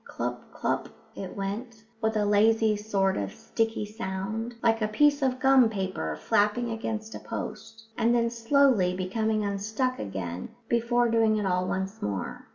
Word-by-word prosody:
Clup, - - -3
clup - - -1 0.3
it 190 0 -7
went, 220 +4 -5 0.2
with 220 -1 +1
a 210 - +2
lazy 215 +1 +4
sort 200 -2 0
of 100 -1 -2
sticky 225 -1 -1
sound, 215 +2 -4
like 225 -1 +3
a 215 - +2
piece 285 +7 +3
of 255 -1 +1
gum 265 -3 +6
paper 190 - -3
flapping 210 - +1
against 220 -1 -4
a - - -6
post, 225 0 -7 0.2
and 235 +1 +3
then 235 -1 +2
slowly 230 -6 +3
becoming 215 +3 0
unstuck 215 +6 -1
again 90 -3 -5 0.2
before 235 +1 +2
doing 225 -1 +3
it 210 - -1
all 180 -1 +1
once 190 +2 -3
more. 100 -2 -4
220 Hz, 160 wpm, -27 LUFS, 195-230 Hz, 0.3 s, gum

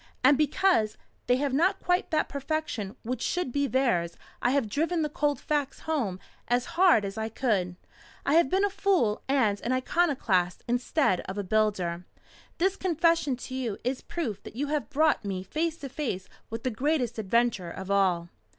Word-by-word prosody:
And 275 +3 +7
because 300 - +2 0.3
they 245 - +4
have 275 0 -1
not 370 +7 +2
quite 360 0 +1
that 310 -2 +1
perfection 275 -8 -3
which 250 +2 -3
should 355 -7 -1
be 285 +2 +1
theirs 240 -11 +1 0.2
I 245 - +3
have 270 -3 +1
driven 325 - 0
the 300 - -1
cold 295 0 0
facts 290 -2 -2
home 240 -13 -1 0.3
as 245 +1 +1
hard 345 - +5
as 200 +2 -5
I 220 0 -2
could. 205 -7 0 0.5
I 280 - +2
have 330 -4 +5
been 385 +5 +3
a 405 - -1
fool 375 - +1
and 225 -7 +2
an 240 - -2
iconoclast 255 - +1
instead 245 - +1
of 190 - -5
a 205 - -1
builder. 185 -4 0 0.5
This 380 +3 +1
confession 335 -5 +2
to 255 - -9
you 245 -6 -2
is 255 +2 -1
proof 245 - -4
that - - -11
you 285 +3 -2
have 300 -1 -1
brought 305 0 +2
me 190 -2 -3
face 320 - -2
to 280 -4 -7
face 240 -10 -3 0.2
with 225 +1 -5
the 255 - 0
greatest 250 -2 0
adventure 220 -3 +1
of 190 +3 -6
all." 180 -4 +2
255 Hz, 180 wpm, -28 LUFS, 210-310 Hz, 0.5 s, And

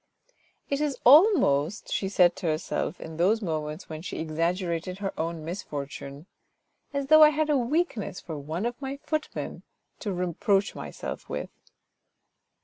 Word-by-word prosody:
" - - -39
It 280 +1 +1
is 295 -3 0
almost," 245 - +5
she 195 - 0
said 180 -3 +4
to 180 - -3
herself, 155 +1 -2
in 160 -1 -8
those 195 +7 +3
moments 155 -1 -3
when 155 -1 -7
she 180 - -6
exaggerated 170 +2 -1
her 195 -1 -3
own 165 -1 -3
misfortune, 145 -4 -6 0.3
" - - -48
as 280 -1 -2
though 310 +3 +7
I 305 - +10
had 305 0 0
a - - +4
weakness 245 - -1
for 160 - -7
one 155 +7 -4
of 240 +2 -3
my 270 0 -4
footmen 310 -1 -3 0.4
to 210 - -3
reproach 185 +3 +1
myself - - -7
with." - - -4
185 Hz, 155 wpm, -27 LUFS, 160-265 Hz, 0.4 s, I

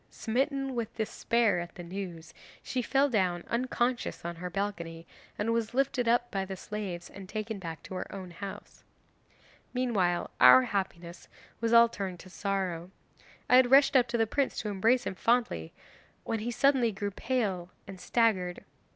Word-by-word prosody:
Smitten 270 +3 -1
with 235 -3 -4
despair 220 -2 +1
at 175 0 -7
the 175 - -8
news, 170 -2 -7 0.3
she 255 - -2
fell 275 +3 +2
down 185 -8 0
unconscious 240 -3 -1
on 170 0 -4
her 180 +1 -5
balcony, 170 -4 -4 0.3
and 225 +2 0
was 230 0 -1
lifted 260 -2 +1
up 240 +1 +2
by 195 -1 -1
the 190 0 -5
slaves 190 -4 -6
and 195 -1 -10
taken 215 -1 -4
back 165 -3 -7
to - - -9
her 185 - -5
own 190 -3 -7
house. 195 +3 -9 0.9
'Meanwhile 200 -9 0
our 125 +1 +9
happiness 175 -1 -4 0.3
was 230 0 0
all 235 0 +8
turned 195 -5 -5
to 185 - -14
sorrow. 185 -4 -2 0.6
I 250 - +7
had 255 -1 +5
rushed 275 +1 +6
up 250 -2 +5
to 235 0 -1
the 225 - +3
prince 275 +5 -1
to 215 - -4
embrace 225 +6 +2
him - - -2
fondly, 230 - 0 0.5
when 225 -1 -2
he 225 +3 -3
suddenly 245 -1 +3
grew 205 0 -3
pale 195 -6 -2 0.2
and 195 -2 -10
staggered. 190 -7 +1
205 Hz, 170 wpm, -30 LUFS, 180-240 Hz, 0.9 s, our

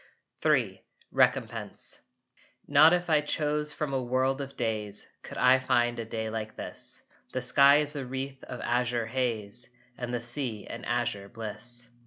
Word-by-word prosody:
III - - +2 0.3
RECOMPENSE - - 0 0.7
Not 160 +1 +7
if 175 0 +1
I 155 -2 +4
chose 150 0 0
from 150 -3 -3
a 135 - +1
world 130 +2 +1
of 140 0 -7
days 105 -3 -2
Could - - -9
I 125 +1 +6
find 120 -2 +1
a 115 - -3
day 110 0 -3
like 110 -1 -4
this. - - -6 0.3
The - - -1
sky 140 +2 +6
is 150 0 +2
a 140 - -3
wreath 135 +1 -5
of 125 - -7
azure 120 -1 0
haze 120 -2 -2 0.3
And 120 -1 -3
the 120 - -1
sea 120 -2 -1
an - - -7
azure 120 -5 -1
bliss. 120 +2 -3
125 Hz, 160 wpm, -29 LUFS, 115-140 Hz, 0.7 s, Not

